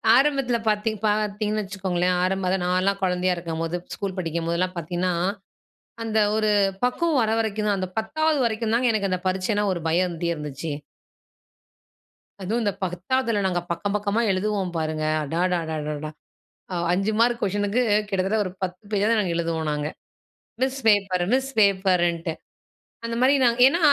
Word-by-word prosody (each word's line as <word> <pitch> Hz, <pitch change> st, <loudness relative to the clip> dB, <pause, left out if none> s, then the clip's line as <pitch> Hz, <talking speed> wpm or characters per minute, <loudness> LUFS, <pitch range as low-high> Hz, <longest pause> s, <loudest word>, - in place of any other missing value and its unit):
ஆரம்பத்தில 270 Hz, -3 st, +3 dB
பாத்தீங் 215 Hz, +1 st, +1 dB
பார்த்தீங்கன்னு 210 Hz, 0 st, 0 dB
வச்சுக்கோங்களேன், 185 Hz, -2 st, -1 dB
ஆரம்பமா 185 Hz, 0 st, 0 dB, 0.2 s
நான்லாம் 185 Hz, +2 st, +1 dB
குழந்தையா 180 Hz, 0 st, +1 dB
இருக்கும்போது, 165 Hz, 0 st, -3 dB, 0.2 s
ஸ்கூல் 195 Hz, -1 st, -4 dB
படிக்கும்போதெல்லாம் 170 Hz, +2 st, -1 dB
பாத்தீன்னா, 175 Hz, +2 st, -1 dB, 0.9 s
அந்த 220 Hz, -1 st, 0 dB, 0.2 s
ஒரு 215 Hz, -1 st, +2 dB, 0.3 s
பக்குவம் 295 Hz, +3 st, +2 dB
வர 220 Hz, 0 st, +1 dB
வரைக்கும் 215 Hz, -1 st, -1 dB
தான் 205 Hz, -, +2 dB
அந்த 185 Hz, -1 st, -3 dB
10 310 Hz, +6 st, 0 dB
வரைக்கும் 220 Hz, -1 st, -1 dB
தாங்க 245 Hz, +1 st, +3 dB
எனக்கு 200 Hz, -2 st, 0 dB
அந்த 185 Hz, -, 0 dB
பரீட்சைன்னா 190 Hz, +3 st, 0 dB
ஒரு 170 Hz, -, -5 dB
பயம் 175 Hz, +3 st, +3 dB
இருந்துட்டே 170 Hz, -1 st, -2 dB
இருந்துச்சு. 150 Hz, +1 st, -5 dB, 1.7 s
அதுவும் 220 Hz, +6 st, -1 dB
இந்த 205 Hz, -, +1 dB
10வதுல 205 Hz, +5 st, 0 dB
நாங்க 175 Hz, -1 st, 0 dB
பக்கம் 200 Hz, +4 st, -2 dB
பக்கமா 210 Hz, +2 st, 0 dB
எழுதுவோம் 190 Hz, -1 st, -1 dB
பாருங்க. 155 Hz, -1 st, -2 dB, 0.2 s
அடடடடடா! 155 Hz, -2 st, -2 dB, 0.8 s
5 195 Hz, +4 st, +1 dB
மார்க் 235 Hz, 0 st, +3 dB
கொஷினுக்கு 205 Hz, +4 st, +1 dB, 0.3 s
கிட்டத்தட்ட 195 Hz, +2 st, 0 dB
ஒரு 185 Hz, -, -4 dB
10 180 Hz, 0 st, -3 dB
பேஜாவது 210 Hz, +3 st, +2 dB
நாங்க 185 Hz, -5 st, 0 dB
எழுதுவோம் 165 Hz, -2 st, -1 dB
நாங்க. 150 Hz, 0 st, -2 dB, 0.7 s
மிஸ் 265 Hz, +1 st, 0 dB
பேப்பர், 195 Hz, -4 st, +3 dB
மிஸ் 265 Hz, +1 st, +1 dB
பேப்பர்ன்ட்டு 180 Hz, -4 st, +2 dB, 0.7 s
அந்த 230 Hz, -, -3 dB
மாரி 260 Hz, +2 st, +5 dB
நாங்க 235 Hz, -1 st, +3 dB
ஏனா, 335 Hz, +6 st, +2 dB
195 Hz, 140 wpm, -24 LUFS, 175-220 Hz, 1.7 s, மாரி